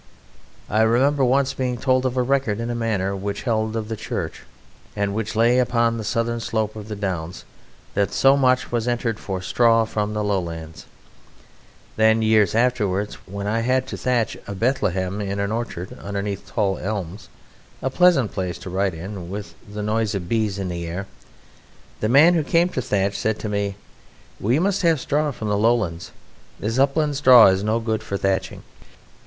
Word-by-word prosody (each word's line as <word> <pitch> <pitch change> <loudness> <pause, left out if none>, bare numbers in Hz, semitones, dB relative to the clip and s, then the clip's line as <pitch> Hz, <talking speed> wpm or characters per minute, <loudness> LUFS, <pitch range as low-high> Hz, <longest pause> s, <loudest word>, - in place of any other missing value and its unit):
I 110 +2 +1
remember 130 +5 +3
once 135 +2 +2
being 125 -2 -2
told 130 +1 +2
of 130 0 -4
a 125 - +3
record 130 -5 0
in 115 +1 -3
a - - -2
manor, 105 -5 -1
which 100 +1 -4
held 110 -2 0
of 110 -2 -3
the 110 - -3
Church 110 - -5 0.5
and 100 -1 -1
which 110 +1 -3
lay 120 +3 +4
upon 115 -2 +1
the - - -4
southern 115 +2 -1
slope 110 -2 -2
of 105 -1 -8
the 110 - -5
Downs, 90 -4 -4 0.5
that 100 -1 0
so 135 +1 +4
much 130 -2 +2
was 120 -1 -1
entered 120 -2 -1
for 95 -2 -5
"straw 115 +3 +3
from 105 -1 -2
the 105 - -1
Lowlands": 85 -5 -4 1.1
then, 110 0 +4
years 110 -3 +3
afterwards, 105 -5 +1
when 100 +1 -5
I 110 +3 0
had 130 +2 +1
to - - -4
thatch 125 -3 0
a 100 - -5
Bethlehem 95 -4 0
in 100 0 -3
an 100 +1 -1
orchard 110 -6 -4
underneath 100 0 -4
tall 100 -4 -1
elms 100 -1 -5 0.5
a 130 - 0
pleasant 170 - +4
place 90 -3 -3
to 90 - -8
write 95 -1 0
in, 90 +1 -7
with 100 +1 -6 0.2
the 105 0 -5
noise 110 0 0
of 90 -3 -4
bees 110 -1 0
in 95 -2 -3
the 85 -1 -4
air 90 +4 -4 0.9
the 110 - 0
man 150 +8 +7
who 165 -3 +1
came 170 +4 +2
to 130 - -3
thatch 100 -3 0
said 110 0 -1
to - - -5
me: 100 -1 -1 0.6
"We 120 +7 +1
must 195 +4 +1
have 165 -4 +3
straw 150 +3 0
from 110 -6 -5
the 105 - +1
Lowlands; 105 -7 +1 0.5
this 115 +5 -2
upland 145 +1 +2
straw 125 -6 +8
is 95 +1 +1
no 110 +2 +1
good 110 -1 -2
for 100 - -4
thatching." 95 -1 -2
110 Hz, 185 wpm, -22 LUFS, 100-125 Hz, 1.1 s, straw